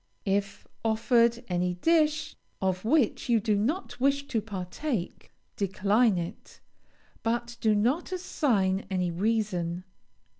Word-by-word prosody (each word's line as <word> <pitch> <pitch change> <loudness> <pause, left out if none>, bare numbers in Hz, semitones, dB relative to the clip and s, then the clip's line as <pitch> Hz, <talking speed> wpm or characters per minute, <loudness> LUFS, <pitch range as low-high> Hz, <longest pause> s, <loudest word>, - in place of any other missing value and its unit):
If 200 0 -1 0.2
offered 235 +1 +2
any 180 0 0
dish 315 - +2 0.2
of 185 -1 -1
which 250 0 +1
you 230 -2 +4
do 215 0 +1
not 245 - -2
wish 280 +2 +1
to 225 - 0
partake, 200 - -4 0.2
decline 205 +2 +2
it, 170 0 -7 0.6
but 235 +1 -1
do 215 -1 +3
not 250 - +1
assign 215 - 0
any 180 -2 0
reason. 180 -3 -1
220 Hz, 115 wpm, -28 LUFS, 190-250 Hz, 0.6 s, you